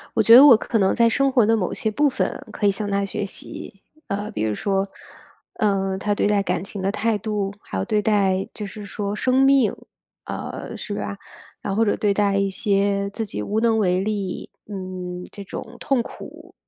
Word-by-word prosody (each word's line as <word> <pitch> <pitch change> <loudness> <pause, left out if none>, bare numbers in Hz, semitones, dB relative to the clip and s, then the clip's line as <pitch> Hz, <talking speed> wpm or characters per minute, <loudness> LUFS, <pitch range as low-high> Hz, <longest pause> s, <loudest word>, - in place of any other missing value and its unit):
我 - - +4
觉 230 - +7
得， 260 +4 +11
我 270 -6 +9
可 225 +1 -1
能 190 -2 +3
在 235 -1 +4
生 275 +4 +2
活 250 -4 +4
的 225 - +4
某 185 -5 -1
些 220 - -2
部 290 +7 +2
分， 265 - -2
可 205 - -1
以 - - +6
向 205 +1 -3
她 200 0 +1
学 200 +1 -3
习。 195 0 -9 0.3
呃， 205 +2 -3
比 210 - -3
如 110 -1 0
说， 195 - -1 0.7
呃， 195 -2 0
她 205 +2 0
对 - - +1
待 205 -1 +2
感 195 - -1
情 200 0 -7
的 195 - +1
态 215 +1 0
度， 205 -1 -2
还 95 - -6
有 95 - 0
对 210 - +1
待 195 -3 +2
就 210 - -5
是 205 +1 -9
说 200 0 -3
生 255 +5 +2
命 270 -4 +4 0.5
啊， - - -6
是 205 - -5
吧。 200 - -4 0.5
啊， 195 - -2
或 225 +3 +3
者 205 - +1
对 205 -2 +1
待 200 -1 +2
一 200 0 +2
些 200 0 0
自 220 +2 -4
己 105 - -5
无 210 - -2
能 225 -1 +3
为 180 -2 +2
力， 200 -2 -3 0.2
嗯 185 -2 -6
这 200 - -8
种 200 - -8
痛 270 -1 +1
苦， - - -11
205 Hz, 225 characters per minute, -22 LUFS, 195-220 Hz, 0.7 s, 得